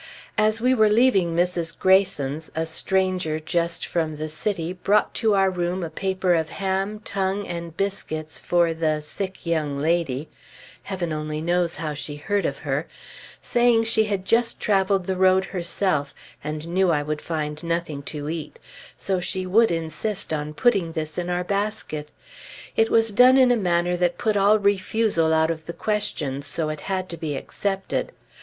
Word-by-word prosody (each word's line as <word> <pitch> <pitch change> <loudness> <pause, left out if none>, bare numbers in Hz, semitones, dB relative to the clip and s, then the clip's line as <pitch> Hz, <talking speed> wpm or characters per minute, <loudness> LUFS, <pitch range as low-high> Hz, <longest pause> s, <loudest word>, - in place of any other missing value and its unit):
As 215 +1 +3
we 250 +3 +3
were 220 -4 +4
leaving 210 -7 +3
Mrs. 170 -1 0
Greyson's, 160 -6 +2
a 160 0 0
stranger 180 -1 0
just 170 +1 -1
from 160 -3 -2
the 155 +1 -4
city, 170 +1 -2
brought 200 +3 +1
to 220 -3 +2
our 195 -1 +3
room 180 0 -2
a 165 - -4
paper 190 +1 0
of 160 -2 0
ham, 195 +2 -2
tongue, 195 0 -1
and 170 -1 -6
biscuits 160 -6 -3
for 170 -1 +2
"the 155 -2 0
sick 190 +5 -6
young 155 -4 0
lady" 155 -2 0 0.5
(Heaven 180 -5 -3
only 155 0 -3
knows 175 +1 0
how 155 -2 -3
she 145 0 -6
heard 195 +6 -1
of 140 - -4
her), 145 +3 -1 0.6
saying 240 -1 +3
she 225 -1 +3
had 200 -3 -2
just 230 +3 +2
traveled 195 -2 +2
the 190 - -1
road 190 0 +4
herself, 170 -5 -1 0.3
and 150 +2 -4
knew 185 +2 +2
I 150 -3 +2
would 150 0 -3
find 150 -2 -3
nothing 165 -4 -2
to 150 -1 -5
eat; 160 - -5 0.4
so 190 -2 -1
she 185 +1 -3
would 225 +5 +4
insist 170 +4 -2
on 150 0 -3
putting 195 -8 +2
this 155 +2 -4
in 175 0 -3
our 180 0 0
basket. 200 -6 -3 0.7
It 225 0 +3
was 225 -1 +4
done 250 +5 +7
in 255 -2 +6
a - - +5
manner 175 -4 +1
that 175 -1 +1
put 215 -2 0
all 205 +2 +5
refusal 200 -4 +1
out 160 0 +3
of 160 -1 -6
the 170 - -4
question; 205 -12 -2
so 155 +2 -3
it 155 -1 -4
had 185 -1 -1
to 170 - -6
be 155 -3 -3
accepted. 195 - -3
175 Hz, 175 wpm, -24 LUFS, 160-200 Hz, 0.7 s, done